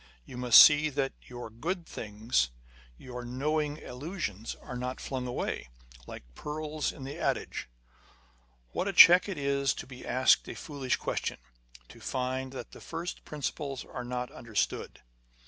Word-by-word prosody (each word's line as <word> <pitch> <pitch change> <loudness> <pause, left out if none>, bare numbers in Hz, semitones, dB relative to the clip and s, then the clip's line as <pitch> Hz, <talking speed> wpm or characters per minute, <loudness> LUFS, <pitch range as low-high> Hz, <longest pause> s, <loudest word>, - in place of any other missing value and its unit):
You - - -10
must 125 -2 +8
see 150 +1 +8
that 135 -1 -1
your 120 -2 -8
good 170 - -3
things, 105 - -1 0.5
your 125 - -8
knowing 150 +4 -1
allusions, 125 - -5
are 125 - -9
not 125 +1 -4
flung 130 -2 -4
away, 120 - -3 0.4
like - - -9
the - - -17
pearls 155 0 -2
in 135 - -10
the 135 +2 -6
adage. - - -2 1.0
What 185 - -1
a 200 - -1
check 180 +2 +9
it 190 - -4
is 140 -1 +1
to - - -6
be 130 -1 -11
asked 130 +1 +4
a - - -6
foolish 140 -4 -2
question; - - -2 0.5
to - - -13
find 130 0 -2
that 130 - -7
the - - -12
first 170 +2 -5
principles 140 -2 -4
are 125 - -6
not 125 0 -4
under 115 -3 -12
stood - - -1
130 Hz, 160 wpm, -30 LUFS, 125-150 Hz, 1.0 s, check